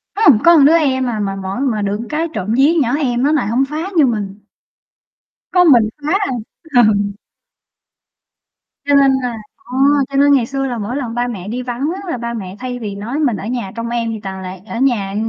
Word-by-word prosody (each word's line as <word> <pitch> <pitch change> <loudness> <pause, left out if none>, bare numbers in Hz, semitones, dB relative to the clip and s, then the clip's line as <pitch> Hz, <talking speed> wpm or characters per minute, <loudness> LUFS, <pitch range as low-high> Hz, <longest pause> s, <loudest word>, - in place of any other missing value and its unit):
Ưm, 295 - +5
có 340 0 +7
đứa 300 +3 +6
em 260 -5 +1
à, 220 -3 -3
mà 195 -1 -2
mỗi 195 +3 -5
mà 240 -6 0
được 205 +1 -2
cái 315 +2 -1
trộm 200 +4 -2
vía 280 +5 +4
nhỏ 250 0 +1
em 250 -5 0
nó 290 - +3
lại 290 -9 +1
hổng 245 +5 +1
phá 315 +5 -4
như 305 - +6
mình. 205 -5 -3 1.1
Có 360 -1 +5
mình 230 -4 +5
phá 300 +4 -1
à. 400 - -1 0.5
Ừ. 225 -3 +6 1.9
Cho 285 - +1
nên 275 -1 +5
là 245 -2 -3 0.2
ờ, 370 -9 -11 0.3
cho 275 - -3
nên 285 +1 +5
ngày 260 -4 +3
xưa 270 +2 -3
là 245 -2 -3
mỗi 220 +4 -4
lần 245 -5 -4
ba 245 0 0
mẹ 200 -6 -6
đi 245 +4 -3
vắng 250 +4 -3
á, 390 - -7
là - - -2
ba 235 0 -4
mẹ 190 -5 -6
thay 250 -1 -5
vì 210 -4 -5
nói 235 +9 -4
mình 250 -9 +1
ở 195 - -7
nhà 235 -4 -4
trông 230 0 -4
em 235 -1 -2
thì 220 - -5
toàn 190 -1 -6
là 185 0 -7
ở 230 - -6
nhà 220 -7 0
245 Hz, 225 wpm, -17 LUFS, 215-275 Hz, 1.9 s, có